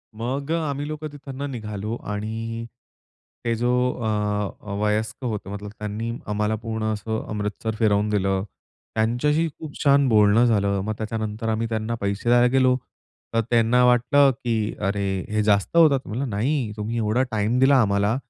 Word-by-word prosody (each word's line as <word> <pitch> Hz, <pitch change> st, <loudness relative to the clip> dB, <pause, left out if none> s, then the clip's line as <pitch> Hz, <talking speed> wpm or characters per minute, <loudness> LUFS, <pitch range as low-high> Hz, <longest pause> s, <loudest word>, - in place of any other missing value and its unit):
मग 135 Hz, +6 st, -3 dB
अ, -, -, +3 dB
आम्ही 140 Hz, +1 st, -3 dB
लोकं 155 Hz, 0 st, -5 dB
तिथून 140 Hz, -2 st, -9 dB
निघालो 105 Hz, -2 st, -4 dB, 0.2 s
आणि 115 Hz, +2 st, -4 dB, 0.8 s
हे 115 Hz, -, +2 dB
जो 120 Hz, +2 st, 0 dB, 0.2 s
अ, 115 Hz, -, -4 dB, 0.5 s
अ, 105 Hz, -, -8 dB
वयस्क 105 Hz, +4 st, -1 dB
होते, 105 Hz, -4 st, -3 dB
मतलब 100 Hz, 0 st, -6 dB
त्यांनी 105 Hz, +2 st, -3 dB, 0.2 s
आम्हाला 105 Hz, +1 st, 0 dB
पूर्ण 110 Hz, 0 st, -4 dB
असं 110 Hz, +1 st, -3 dB
अमृतसर 105 Hz, +1 st, -3 dB
फिरवून 105 Hz, -1 st, +2 dB
दिलं. 95 Hz, -2 st, +1 dB, 0.5 s
त्यांच्याशी 125 Hz, +9 st, +1 dB
खूप 155 Hz, -3 st, -8 dB
छान 140 Hz, -1 st, +5 dB
बोलणं 105 Hz, +1 st, +5 dB
झालं. 100 Hz, -4 st, +2 dB
मग 110 Hz, -, -1 dB
त्याच्यानंतर 110 Hz, 0 st, -3 dB
आम्ही 110 Hz, +1 st, 0 dB
त्यांना 110 Hz, +1 st, -2 dB
पैसे 100 Hz, +3 st, -1 dB
द्यायला 120 Hz, 0 st, +6 dB
गेलो, 130 Hz, -1 st, +4 dB, 0.6 s
तर 115 Hz, -, +3 dB
त्यांना 120 Hz, +1 st, +4 dB
वाटलं, 125 Hz, +3 st, +5 dB
की 115 Hz, -3 st, -2 dB
अरे, 100 Hz, -2 st, -1 dB
हे 105 Hz, 0 st, +1 dB
जास्त 105 Hz, +9 st, +2 dB
होतात. 155 Hz, -5 st, +6 dB
म्हणलं 125 Hz, +5 st, -3 dB
नाही, 115 Hz, +3 st, 0 dB
"तुम्ही 110 Hz, +3 st, -3 dB
एवढा 115 Hz, +3 st, +1 dB
टाईम 110 Hz, +3 st, +1 dB
दिला 135 Hz, +1 st, +6 dB
आम्हाला, 100 Hz, +1 st, +2 dB
110 Hz, 155 wpm, -24 LUFS, 105-125 Hz, 0.8 s, द्यायला